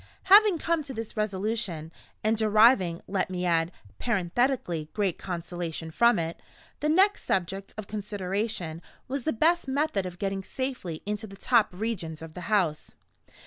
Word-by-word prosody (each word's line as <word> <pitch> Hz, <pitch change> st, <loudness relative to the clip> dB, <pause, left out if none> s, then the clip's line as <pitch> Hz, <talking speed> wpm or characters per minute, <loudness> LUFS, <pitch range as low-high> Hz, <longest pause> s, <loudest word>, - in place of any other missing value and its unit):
Having 415 Hz, -3 st, +8 dB
come 330 Hz, 0 st, 0 dB
to 270 Hz, -2 st, -7 dB
this 225 Hz, 0 st, -6 dB
resolution 195 Hz, -6 st, -2 dB, 0.3 s
(and 215 Hz, +1 st, +3 dB
deriving, 215 Hz, -5 st, +4 dB
let 195 Hz, -1 st, 0 dB
me 180 Hz, -1 st, -2 dB
add, 165 Hz, -1 st, +2 dB, 0.3 s
parenthetically, 190 Hz, -, 0 dB
great 200 Hz, -5 st, 0 dB
consolation 170 Hz, -2 st, -5 dB
from 235 Hz, +5 st, +4 dB
it), 165 Hz, 0 st, -3 dB, 0.4 s
the 300 Hz, -, 0 dB
next 385 Hz, +6 st, +4 dB
subject 195 Hz, +1 st, -1 dB
of 215 Hz, -, -5 dB
consideration 200 Hz, -4 st, -3 dB, 0.3 s
was 265 Hz, -1 st, -3 dB
the 315 Hz, -, +2 dB
best 330 Hz, +7 st, +2 dB
method 265 Hz, -9 st, 0 dB
of 180 Hz, -1 st, -8 dB
getting 195 Hz, 0 st, -2 dB
safely 245 Hz, -, -4 dB
into 210 Hz, +1 st, -3 dB
the 195 Hz, -1 st, -12 dB
top 235 Hz, 0 st, +3 dB
regions 180 Hz, -6 st, -4 dB
of 160 Hz, -1 st, -9 dB
the 180 Hz, 0 st, -7 dB
house. 180 Hz, -8 st, 0 dB
200 Hz, 150 wpm, -28 LUFS, 175-235 Hz, 0.4 s, Having